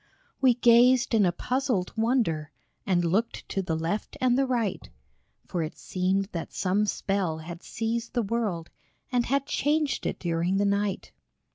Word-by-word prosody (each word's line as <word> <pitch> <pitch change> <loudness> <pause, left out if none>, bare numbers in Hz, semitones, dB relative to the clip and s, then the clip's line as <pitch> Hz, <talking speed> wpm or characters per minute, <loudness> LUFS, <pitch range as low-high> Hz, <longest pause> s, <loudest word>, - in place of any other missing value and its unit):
We 255 -3 +5
gazed 245 +1 +5
in 210 -4 +5
a - - +2
puzzled 245 -1 -1
wonder, 220 - 0 0.4
And 175 -3 +2
looked 200 +8 -1
to 195 - -1
the 170 -4 -2
left 165 +6 -3
and 250 -1 +3
the 270 +1 +2
right, 235 -6 -1 0.6
For 175 - -2
it 155 - -4
seemed 190 +2 0
that 165 -2 -5
some 200 +3 +1
spell 195 -6 -1
had 170 +2 -8
seized 230 +1 -3
the 240 - +1
world 200 -6 -2 0.4
And 245 -2 +1
had 275 +1 +1
changed 295 0 0
it - - -3
during 175 +2 0
the 205 - +2
night. 200 0 -1
205 Hz, 160 wpm, -27 LUFS, 175-240 Hz, 0.6 s, We